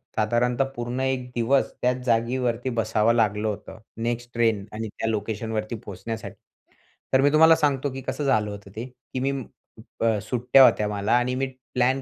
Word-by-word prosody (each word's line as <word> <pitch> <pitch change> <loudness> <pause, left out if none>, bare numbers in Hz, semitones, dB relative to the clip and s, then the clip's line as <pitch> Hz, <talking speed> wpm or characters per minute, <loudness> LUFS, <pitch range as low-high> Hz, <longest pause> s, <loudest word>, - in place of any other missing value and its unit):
साधारणतः 120 +4 +1
पूर्ण 120 +1 -3
एक 130 -1 -1
दिवस 125 +4 +2
त्याच 125 0 +2
जागेवरती 120 +1 0
बसावं 110 +1 +2
लागलं 105 -2 +1
होतं, 105 0 -5 0.2
नेक्स्ट 120 +1 -3
ट्रेन 115 -4 +1
आणि 110 +1 -4
त्या 110 +2 -4
लोकेशनवरती 110 +1 -3
पोहोचण्यासाठी. 105 +3 -6 0.8
तर 130 - +5
मी 145 - +5
तुम्हाला 160 +1 +7
सांगतो 145 -2 0
की 135 - -6
कसं 150 - -2
झालं 110 -6 +2
होतं. 100 -1 -10
ते 115 +3 -4 0.3
की 130 - -1
मी 135 +2 0 0.5
उप 115 0 -9 0.3
सुट्ट्या 125 +2 +5
होत्या 105 -4 +4
मला 105 0 -2
आणि 125 +1 0
मी 135 +1 -1 0.3
प्लॅन 130 +2 +2
120 Hz, 165 wpm, -25 LUFS, 110-130 Hz, 0.8 s, तुम्हाला